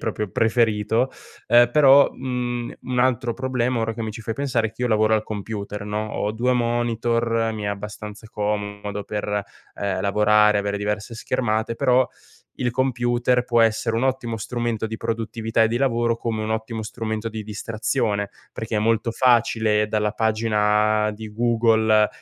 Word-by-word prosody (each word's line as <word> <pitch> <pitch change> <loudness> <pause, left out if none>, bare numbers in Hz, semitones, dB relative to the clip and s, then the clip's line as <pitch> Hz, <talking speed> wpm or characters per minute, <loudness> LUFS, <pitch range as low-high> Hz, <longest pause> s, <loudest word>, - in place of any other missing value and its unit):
proprio 105 -2 -3
preferito, 115 +2 +1 0.4
ehm, 120 0 +6
però, 140 0 +6
mhmm, 125 -2 -3
un 125 -1 -3
altro 125 -2 +1
problema, 130 -1 -1
ora 115 0 -1
che 115 - -6
mi 110 - -3
ci 110 +2 -9
fai 115 - -3
pensare, 125 -3 0
è - - -16
che 115 - -14
io 125 - +1
lavoro 110 -1 +3
al 110 0 +3
computer, 105 -1 -5
no? 105 +1 -3
Ho 105 - -1
due 125 +3 +1
monitor, 115 -1 0
mi 105 -1 -5
è - - -1
abbastanza 105 +1 -6
comodo 105 -1 -3
per, 105 -1 -2 0.3
ehm, 95 -2 -2
lavorare, 105 +1 +4
avere 100 0 -1
diverse 105 +2 -3
schermate, 110 0 -1
però 125 +2 +3 0.5
il 125 - 0
computer 120 -1 +1
può 120 -1 +2
essere 115 0 +2
un 125 - 0
ottimo 125 -4 -1
strumento 115 0 -2
di 110 0 -5
produttività 115 0 -1
e 110 - +2
di 115 - -1
lavoro 120 -3 +1
come 115 -2 -3
un 110 - -3
ottimo 110 0 -3
strumento 110 0 -4
di 110 0 -6
distrazione, 110 0 -2 0.2
perché 110 0 -4
è - - +2
molto 115 +1 +1
facile 115 -3 +2
dalla 105 0 0
pagina 105 -1 +2
di 110 0 -8
Google 110 -2 +3
110 Hz, 165 wpm, -23 LUFS, 105-120 Hz, 0.5 s, ehm